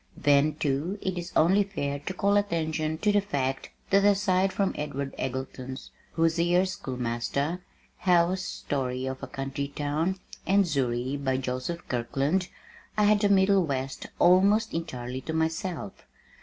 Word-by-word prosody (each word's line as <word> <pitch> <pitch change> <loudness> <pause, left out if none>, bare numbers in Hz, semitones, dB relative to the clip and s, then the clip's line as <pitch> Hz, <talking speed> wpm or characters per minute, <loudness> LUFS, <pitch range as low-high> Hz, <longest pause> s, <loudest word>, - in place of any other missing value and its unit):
Then 145 +1 +3
too, 150 +6 -1
it 190 -2 -2
is 175 0 -5
only 190 +6 +5
fair 140 -8 -3
to 150 +6 -5
call 200 +2 +2
attention 160 -5 0
to 210 +5 +2
the 205 0 +3
fact 135 -8 -2 0.2
that 195 0 +5
aside 195 -2 +3
from 195 0 0
Edward 140 -2 -4
Eggleston's 130 0 -5 0.2
Hoosier 170 +2 +3
Schoolmaster, 135 +1 -2 0.4
Howe's 180 +1 +3
Story 130 -6 -3
of 130 0 -4
a - - -5
Country 135 +1 -4
Town, 150 +6 -1 0.3
and 195 +1 +4
Zury, 135 -2 -1
by 130 -1 +1
Joseph 130 +7 -4
Kirkland, 140 +9 0 0.5
I 210 - +4
had 210 0 +5
the 205 -1 +2
middle 195 -1 +4
west 135 -3 -3
almost 200 +5 +4
entirely 130 -6 -4
to 160 - -5
myself. 160 - -3
160 Hz, 140 wpm, -27 LUFS, 135-190 Hz, 0.5 s, only